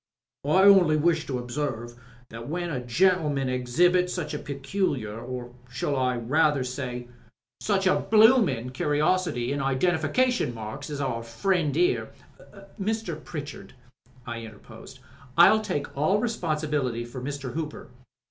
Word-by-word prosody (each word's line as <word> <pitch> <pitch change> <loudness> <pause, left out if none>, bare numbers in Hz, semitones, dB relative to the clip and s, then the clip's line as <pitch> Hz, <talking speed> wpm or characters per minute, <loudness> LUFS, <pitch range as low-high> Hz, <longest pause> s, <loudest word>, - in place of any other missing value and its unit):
"I 185 +6 +4
only 190 -6 +6
wish 165 0 +1
to 130 - -2
observe 120 -1 -4 0.4
that 115 +1 -8
when 175 +1 -3
a 125 -4 -3
gentleman 145 0 +2
exhibits 175 +9 +2
such 160 -5 -4
a 150 - -3
peculiar, 140 - -3
or 125 0 -6 0.2
I - - -24
should 125 -2 -1
rather 150 -1 +3
say, 125 -1 -5 0.5
such 195 -2 0
a 185 - +4
bloomin* 215 - +4
curiosity 150 -1 0
in 140 - -2
identification 160 - +1
marks 110 +6 -7
as 145 -1 -4
our 115 -4 -2
friend 150 +8 0
here 360 +2 +1 0.4
" - - -15
"Mr. 195 -7 -3
Pritchard," 145 -3 -8 0.5
I 115 -1 -5
interposed, 110 -2 -12 0.4
"I'll 215 +6 +7
take 145 -9 -4
all 155 +8 +2
the 210 - 0
responsibility 150 - -1
for 120 +2 -8
Mr. 140 -2 -5
Hooper." 155 -2 -5
145 Hz, 140 wpm, -26 LUFS, 125-180 Hz, 0.5 s, I'll